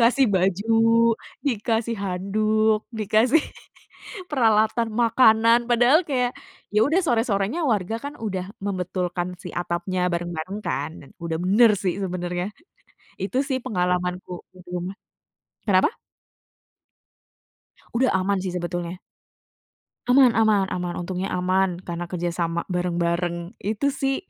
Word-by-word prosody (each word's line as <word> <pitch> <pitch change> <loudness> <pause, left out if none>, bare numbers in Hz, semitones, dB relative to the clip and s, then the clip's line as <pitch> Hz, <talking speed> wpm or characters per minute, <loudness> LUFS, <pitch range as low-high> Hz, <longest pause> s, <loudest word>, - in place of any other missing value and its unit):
Dikasih 250 +3 +4
baju, 195 +4 +1 0.7
dikasih 230 -1 0
handuk, 215 +3 +1
dikasih 220 +7 +3 0.9
peralatan 225 -3 +2
makanan, 230 0 +4
padahal 245 +8 +5
kayak, 250 -3 +1 0.4
ya 210 - +4
udah 320 +6 +2
sore-sore 225 -7 +1
nya 340 +2 -2
warga 220 -5 0
kan 285 - -5
udah 190 -4 -4
membetulkan 180 -2 -2
si 180 - -6
atap 175 0 -2
nya 180 -1 +1
bareng-bareng 175 +2 -3
kan, - - -2
dan 140 - -16
udah 165 -1 -2
bener 215 +5 +6
sih 185 -3 -1
sebenernya. 180 -1 -3 0.7
Itu 205 +7 -2
sih 270 -2 -1
pengalamanku 180 -4 -1 0.2
di - - -16
rumah, 180 +2 -4 0.7
kenapa? 190 - +3 2.0
Udah 255 +2 +3
aman 190 +1 +1
sih 185 -2 -3
sebetulnya. 175 0 -4 1.1
Aman 250 -1 +6
aman 215 -3 +3
aman, 180 -1 -3
untungnya 185 +2 -3
aman 185 0 +1
karena 175 0 -5
kerjasama 170 -1 -2
bareng-bareng 170 0 -1
itu 220 +8 -1
sih, 270 0 0
195 Hz, 115 wpm, -24 LUFS, 180-230 Hz, 2.0 s, bener